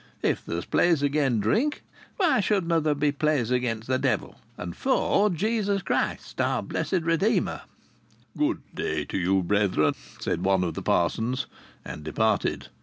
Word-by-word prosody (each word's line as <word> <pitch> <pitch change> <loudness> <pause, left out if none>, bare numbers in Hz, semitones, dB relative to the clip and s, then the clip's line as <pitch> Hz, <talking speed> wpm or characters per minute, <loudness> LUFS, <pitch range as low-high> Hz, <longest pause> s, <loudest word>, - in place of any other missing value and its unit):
If - - +1
there's 85 +1 -4
plays 165 -5 +2
agen 140 -5 +2
drink, 230 - +1 0.3
why 350 - +3
shouldna' 175 -5 +1
there 150 -1 +1
be 145 0 +1
plays 145 -5 0
agen 120 -3 0
the 130 +1 0
devil, - - -1 0.2
and 90 -1 -6
for 210 -5 +2
Jesus 200 +1 0
Christ, - - -1
our - - 0
Blessed 180 -3 -1
Redeemer?" 180 +5 +1 0.7
"Good - - 0
day - - -2
to - - -4
you, 95 +1 +2
brethren," 90 -5 +2 0.3
said 85 - -2
one 95 -1 +3
of 85 -2 -2
the - - -5
parsons, 115 +9 0 0.4
and 75 - -7
departed. 105 +6 0
140 Hz, 150 wpm, -26 LUFS, -, 0.7 s, why